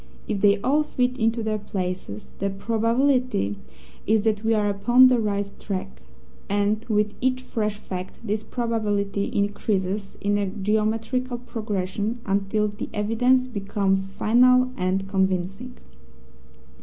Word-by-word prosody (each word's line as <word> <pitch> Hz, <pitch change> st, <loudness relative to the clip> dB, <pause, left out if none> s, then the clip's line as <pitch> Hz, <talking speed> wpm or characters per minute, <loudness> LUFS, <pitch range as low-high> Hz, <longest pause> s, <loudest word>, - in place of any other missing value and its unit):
If 205 Hz, -3 st, -2 dB
they 205 Hz, 0 st, +5 dB
all 290 Hz, +6 st, +3 dB
fit 255 Hz, -4 st, 0 dB
into 225 Hz, 0 st, +1 dB
their 215 Hz, -1 st, -1 dB
places, 180 Hz, -, -5 dB
the 195 Hz, -, 0 dB
probability 230 Hz, -, +1 dB, 0.5 s
is 215 Hz, 0 st, +3 dB
that 215 Hz, -1 st, 0 dB
we 225 Hz, 0 st, +3 dB
are 210 Hz, -1 st, +1 dB
upon 240 Hz, +6 st, +5 dB
the 250 Hz, -2 st, +3 dB
right 205 Hz, -2 st, 0 dB
track, 185 Hz, -, -5 dB, 0.5 s
and 205 Hz, +2 st, +1 dB
with 210 Hz, -1 st, +1 dB
each 255 Hz, 0 st, 0 dB
fresh 210 Hz, -4 st, -2 dB
fact 185 Hz, -2 st, -7 dB
this 210 Hz, 0 st, -1 dB
probability 205 Hz, -4 st, -1 dB
increases 200 Hz, -1 st, -1 dB
in 205 Hz, 0 st, +1 dB
a 200 Hz, -, 0 dB
geometrical 220 Hz, +5 st, -1 dB
progression 215 Hz, -2 st, -3 dB
until 200 Hz, +2 st, +1 dB
the 205 Hz, 0 st, -6 dB
evidence 245 Hz, +5 st, +2 dB
becomes 195 Hz, -4 st, -1 dB
final 250 Hz, +5 st, +4 dB
and 190 Hz, -2 st, -1 dB
convincing. 195 Hz, +5 st, -1 dB
210 Hz, 130 wpm, -24 LUFS, 195-230 Hz, 0.5 s, they